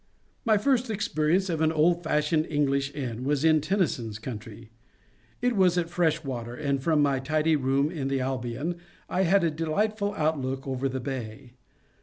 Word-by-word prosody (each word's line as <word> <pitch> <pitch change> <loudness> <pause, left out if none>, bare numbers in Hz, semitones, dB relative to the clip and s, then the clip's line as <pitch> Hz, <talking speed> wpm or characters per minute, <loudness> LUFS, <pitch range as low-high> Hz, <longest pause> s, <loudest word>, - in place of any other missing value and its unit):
My 220 -2 +4
first 250 +2 +1
experience 190 -3 +1
of 165 -3 -2
an 160 0 +3
old 165 +2 +3
fashioned 155 0 +1
English 140 -2 0
inn 125 -4 -4
was 145 +2 +1
in 155 -1 +5
Tennyson's 150 - -1
country. 110 -1 -8 0.7
It 245 -1 +2
was 185 -3 +4
at 170 -1 -1
Freshwater, 145 -9 -1
and 140 -1 -1
from 155 0 +3
my 140 -2 +2
tidy 155 +3 +1
room 140 +2 +1
in 145 -6 -3
the 135 0 0
Albion 130 +5 -3 0.3
I 190 +1 +1
had 190 +2 +4
a 165 - +2
beautiful 205 +7 -1
outlook 135 -5 -1
over 135 0 -1
the 130 0 -4
bay. 125 -1 -6
150 Hz, 165 wpm, -27 LUFS, 130-170 Hz, 0.7 s, in